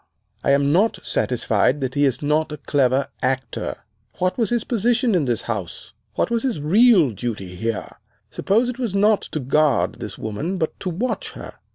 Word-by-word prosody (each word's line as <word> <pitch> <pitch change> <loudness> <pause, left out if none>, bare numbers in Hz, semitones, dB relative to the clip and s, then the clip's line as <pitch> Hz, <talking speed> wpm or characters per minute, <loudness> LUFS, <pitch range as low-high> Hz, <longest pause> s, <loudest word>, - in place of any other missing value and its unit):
I - - +1
am 140 +1 +3
not 200 +8 +3
satisfied 125 +2 +1
that 130 -1 -2
he 145 0 +2
is 135 +1 0
not 150 +2 +1
a 150 - -5
clever 140 -2 +1
actor. 130 0 -2 0.3
What 185 0 0
was 230 -3 0
his 240 -2 0
position 240 +1 +1
in 170 -6 +2
this 120 -3 -1
house! 100 -4 -5 0.2
What - - 0
was 235 -1 +1
his 245 - -1
real 185 - +5
duty 100 -4 -5
here? 115 +3 -4 0.3
Suppose 225 +5 +1
it 250 0 -4
was 230 -6 -2
not 210 +1 +4
to 155 - -5
guard 150 +2 +1
this - - -7
woman, 145 - -3
but 160 -3 -3
to 185 - -3
watch 205 +9 -3
her. - - -9
150 Hz, 185 wpm, -22 LUFS, 130-210 Hz, 0.3 s, real